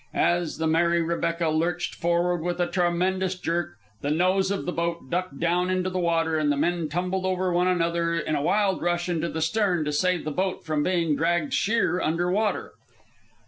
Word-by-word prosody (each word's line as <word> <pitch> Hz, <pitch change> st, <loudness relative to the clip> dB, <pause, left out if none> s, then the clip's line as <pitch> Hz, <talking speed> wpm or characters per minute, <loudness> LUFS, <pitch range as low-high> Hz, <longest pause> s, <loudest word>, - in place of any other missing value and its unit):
As 170 Hz, -1 st, +1 dB
the 160 Hz, -, -1 dB
Mary 170 Hz, +2 st, +3 dB
Rebecca 170 Hz, 0 st, -1 dB
lurched 165 Hz, +2 st, -1 dB
forward 175 Hz, 0 st, 0 dB
with 175 Hz, +2 st, -2 dB
a 175 Hz, -, +3 dB
tremendous 185 Hz, +1 st, 0 dB
jerk, 175 Hz, 0 st, -2 dB, 0.3 s
the 145 Hz, -, -2 dB
nose 185 Hz, +5 st, +2 dB
of 200 Hz, 0 st, -2 dB
the 180 Hz, -, -1 dB
boat 170 Hz, -5 st, -3 dB
ducked 180 Hz, -5 st, -2 dB
down 175 Hz, +2 st, +1 dB
into 185 Hz, 0 st, 0 dB
the 185 Hz, -, -2 dB
water, 165 Hz, -2 st, +1 dB
and 150 Hz, -1 st, +2 dB
the 145 Hz, -, 0 dB
men 170 Hz, +1 st, 0 dB
tumbled 180 Hz, +4 st, -2 dB
over 185 Hz, -1 st, 0 dB
one 180 Hz, +1 st, +2 dB
another 170 Hz, -1 st, +1 dB
in 155 Hz, -2 st, -2 dB
a 145 Hz, -, 0 dB
wild 195 Hz, +4 st, +1 dB
rush 175 Hz, 0 st, 0 dB
into 170 Hz, -1 st, -1 dB
the 160 Hz, -, -4 dB
stern 180 Hz, -2 st, +1 dB
to 150 Hz, -, -1 dB
save 180 Hz, +3 st, 0 dB
the 155 Hz, -, -2 dB
boat 185 Hz, +5 st, -2 dB
from 155 Hz, -2 st, 0 dB
being 170 Hz, -2 st, +1 dB
dragged 165 Hz, -1 st, 0 dB
sheer 215 Hz, -4 st, +1 dB
under 175 Hz, +3 st, 0 dB
water. 210 Hz, +2 st, 0 dB
175 Hz, 195 wpm, -25 LUFS, 165-185 Hz, 0.3 s, Mary